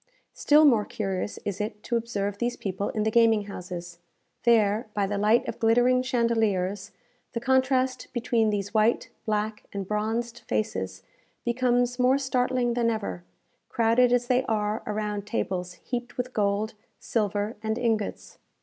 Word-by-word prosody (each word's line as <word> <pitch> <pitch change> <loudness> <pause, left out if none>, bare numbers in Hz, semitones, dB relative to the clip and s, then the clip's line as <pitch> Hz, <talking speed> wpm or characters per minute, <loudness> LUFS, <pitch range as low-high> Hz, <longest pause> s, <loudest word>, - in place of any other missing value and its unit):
Still 300 +1 +5
more 235 -7 +5
curious 195 -1 -3
is 200 0 -2
it 210 0 -5
to 235 - -2
observe 205 -4 -2
these 240 0 -1
people 195 0 -3
in 215 - -1
the 220 - +1
gaming 225 -2 +4
houses. 175 -3 -7 0.5
There, 220 -2 +3
by 205 -1 +2
the 200 +1 -2
light 215 +3 +3
of - - -5
glittering 245 +3 +4
chandeliers, 220 -6 0 0.4
the 230 - -1
contrast 260 0 +1
between 230 -2 +1
these 205 -1 -2
white, 220 +1 +2 0.2
black, 215 0 -1
and 195 -2 -5
bronzed 225 +3 -2
faces 95 -3 -2 0.4
becomes 245 0 +1
more 255 +2 +4
startling 250 -2 0
than 235 -1 +1
ever, 215 -5 -3 0.5
crowded 235 +2 +3
as 245 0 +3
they 250 +1 +2
are 215 -1 -1
around 210 -1 -3
tables 180 -5 -2
heaped 245 0 -6
with 250 0 -3
gold, 205 +1 0 0.2
silver, 210 0 -1
and 220 0 -1
ingots. 225 -4 -2
220 Hz, 150 wpm, -26 LUFS, 205-245 Hz, 0.5 s, Still